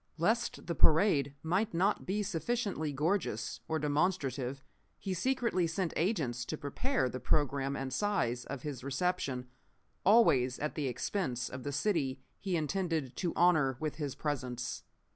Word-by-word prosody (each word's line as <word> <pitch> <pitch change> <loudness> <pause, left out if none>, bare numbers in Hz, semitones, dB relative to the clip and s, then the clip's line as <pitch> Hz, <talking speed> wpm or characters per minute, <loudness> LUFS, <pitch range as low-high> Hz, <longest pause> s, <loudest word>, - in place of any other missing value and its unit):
Lest 220 +9 0
the 170 - -1
parade 155 -4 +4
might 185 +5 0
not 195 +5 +1
be 205 +3 0
sufficiently 200 -3 -1
gorgeous 145 - -1
or 160 - 0
demonstrative 145 -4 0 0.3
he 190 - -3
secretly 230 -3 +1
sent 165 +1 -1
agents 150 - 0
to 155 - -4
prepare 155 - 0
the 130 +1 -4
programme 140 -1 +1
and 135 -2 -3
size 130 - 0
of 135 -2 -6
his 145 -5 -5
reception, 140 -3 -1 0.6
always 135 - +5
at 150 - -2
the 150 -3 -1
expense 125 - -2
of 130 - -6
the 145 - -3
city 145 -6 0 0.2
he 190 -3 -1
intended 160 -4 -1
to 175 -3 0
honor 155 -7 +4
with 155 -2 -3
his 145 -4 -3
presence. 125 -5 -3
155 Hz, 145 wpm, -32 LUFS, 135-185 Hz, 0.6 s, always